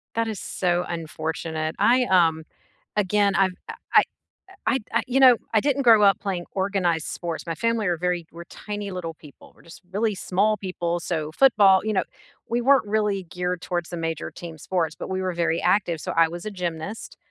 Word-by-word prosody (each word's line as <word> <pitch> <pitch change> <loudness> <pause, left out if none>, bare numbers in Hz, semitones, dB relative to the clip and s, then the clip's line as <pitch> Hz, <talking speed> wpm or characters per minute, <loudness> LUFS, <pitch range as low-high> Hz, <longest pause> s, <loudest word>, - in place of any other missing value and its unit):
That 230 0 0
is 215 -4 -4
so 175 -1 -1
unfortunate. 160 -1 -4
I, 250 +2 +4
um, 165 -5 +3 0.5
again 205 0 +2
I've 190 -1 +3 0.2
I - - -5 0.2
I - - +8 0.6
I 265 - +3 0.2
I, - - -1
you 255 +2 +1
know, 255 -2 +8 0.2
I 220 - +5
didn't 280 +1 +1
grow 225 -4 +6
up 200 -1 +5
playing 190 -4 -3
organized 190 -4 0
sports. 170 -2 -5
My 165 - -2
family 230 +4 0
are 175 -1 +1
very 175 -1 -2
we're 170 +1 -9
tiny 205 +2 -6
little 175 -3 -5
people, 150 -2 -16
we're - - -22
just 170 - -14
really 215 +1 0
small 200 +3 +1
people. 175 -3 -3
So 160 -3 -3
football 200 -4 +5
you 215 - 0
know, 185 -3 +1 0.4
we 235 +1 0
weren't 270 -2 +4
really 205 -2 0
geared 180 +1 -3
towards 175 -1 -3
the 175 - -5
major 165 -1 -3
team 165 -2 -9
sports, 165 -1 -1
but - - -6
we 190 0 -1
were 185 - -1
very 170 -1 0
active. 175 -6 +1
So, - - -4
I 165 0 +5
was 175 +4 -8
a - - -2
gymnast, 180 +1 -5
180 Hz, 200 wpm, -24 LUFS, 170-210 Hz, 0.6 s, I